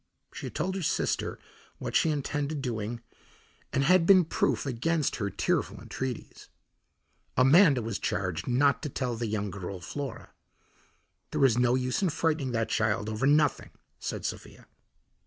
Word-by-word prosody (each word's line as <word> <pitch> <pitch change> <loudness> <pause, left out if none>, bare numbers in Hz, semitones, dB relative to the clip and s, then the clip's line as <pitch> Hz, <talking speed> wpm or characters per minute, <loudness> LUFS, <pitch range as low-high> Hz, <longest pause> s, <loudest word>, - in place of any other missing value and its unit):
She - - -6
had - - -10
told 185 +5 -1
her 190 - -3
sister 160 - -1 0.4
what - - -5
she 160 - +4
intended 145 0 -2
doing 115 -1 -3 0.7
and 135 - +1
had 170 +2 +4
been 185 -3 +7
proof 140 -6 0
against 145 +4 0
her 105 -3 -1
tearful - - -1
entreaties. 130 -2 -6 0.9
Amanda 135 - +6
was 115 -2 -3
charged 90 -4 -2
not 140 +3 +3
to 150 - -4
tell 125 -2 -2
the 115 0 -3
young 105 -2 -2
girl, 95 0 -6
Flora. 135 - -6 1.0
"There 135 - +2
is 125 -2 +3
no 125 0 +3
use 130 +4 -1
in 190 - +2
frightening 155 -4 0
that 115 -1 0
child 110 -1 0
over 110 +5 0
nothing," 150 0 +3 0.3
said - - -4
Sophia. - - -6
130 Hz, 155 wpm, -28 LUFS, 115-150 Hz, 1.0 s, been